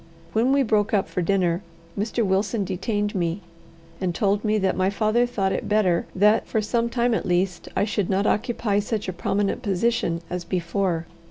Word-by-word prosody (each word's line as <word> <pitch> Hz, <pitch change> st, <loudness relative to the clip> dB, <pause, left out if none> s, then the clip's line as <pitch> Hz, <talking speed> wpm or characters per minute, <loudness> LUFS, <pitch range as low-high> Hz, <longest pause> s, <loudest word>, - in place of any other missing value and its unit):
When 235 Hz, +4 st, +3 dB
we 275 Hz, 0 st, +4 dB
broke 215 Hz, -2 st, +2 dB
up 195 Hz, -, +1 dB
for 180 Hz, -, -2 dB
dinner, 180 Hz, -1 st, +1 dB, 0.3 s
Mr. 220 Hz, +2 st, -1 dB
Wilson 200 Hz, +3 st, +1 dB
detained 205 Hz, +3 st, -2 dB
me, 175 Hz, 0 st, -1 dB, 0.6 s
and 180 Hz, -2 st, -1 dB
told 205 Hz, 0 st, +1 dB
me 215 Hz, -1 st, +2 dB
that 190 Hz, -2 st, +1 dB
my 185 Hz, +1 st, +2 dB
father 215 Hz, +4 st, +2 dB
thought 195 Hz, -5 st, -1 dB
it -, -, -3 dB
better 195 Hz, -5 st, +2 dB
that, 210 Hz, +3 st, +4 dB
for 220 Hz, -, 0 dB
some 230 Hz, +2 st, 0 dB
time 240 Hz, 0 st, +1 dB
at -, -, 0 dB
least, 180 Hz, +1 st, 0 dB
I -, -, +2 dB
should 205 Hz, -3 st, -1 dB
not 195 Hz, +1 st, +1 dB
occupy 210 Hz, -2 st, +1 dB
such 210 Hz, 0 st, -2 dB
a 185 Hz, -, -2 dB
prominent 195 Hz, +3 st, -1 dB
position 195 Hz, -4 st, 0 dB
as 180 Hz, 0 st, -4 dB
before. 175 Hz, -1 st, -1 dB
200 Hz, 185 wpm, -24 LUFS, 185-220 Hz, 0.6 s, we